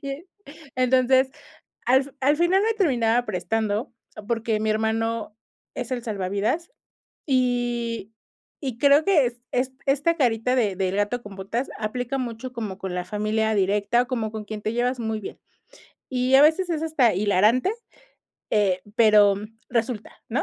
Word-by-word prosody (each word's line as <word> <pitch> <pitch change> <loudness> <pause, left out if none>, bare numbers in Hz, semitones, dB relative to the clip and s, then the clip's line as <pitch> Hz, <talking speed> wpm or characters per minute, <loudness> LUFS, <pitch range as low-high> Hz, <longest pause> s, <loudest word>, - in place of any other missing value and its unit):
y, 275 +3 -6 0.5
entonces, 260 +1 +3 0.6
al 260 +2 +5
fin 280 - -14
al 290 +3 +4
final 370 +4 +3
me 450 0 +2
terminaba 245 - +2
prestando 215 +4 -2 0.4
porque 225 -2 0
mi 215 0 0
hermano 220 0 -1 0.4
es - - -5
el 245 -2 -1
salvavidas, 210 - -2 0.6
y 240 -4 0 0.5
y 260 -5 -4
creo 285 +3 +5
que 335 -9 +4
es 240 0 -9
es 255 +1 0
esta 290 +5 +2
carita 250 -3 +1
de 210 -6 +1
del 190 0 -1
gato 205 +4 0
con 205 -3 -11
botas 225 +7 -3
aplica 245 +5 -3
mucho 250 0 -5
como 215 -6 -5
con 190 -3 -4
la 180 - -2
familia 215 +2 0
directa 205 +4 +2
o - - -13
como 225 -5 -2
con 220 -1 -6
quien 215 0 -6
te 215 +2 -2
llevas 245 +1 0
muy 220 -1 -2
bien, 200 - -8 0.7
y 255 0 +2
a 275 - +8
veces 335 +4 +3
es 320 -2 -1
hasta 280 - +3
hilarante, 210 - +3 0.8
eh, 190 -3 +2
pero 210 -3 +6 0.3
resulta, 230 -2 -2 0.2
¿no?, 235 - 0
235 Hz, 155 wpm, -24 LUFS, 215-260 Hz, 0.8 s, a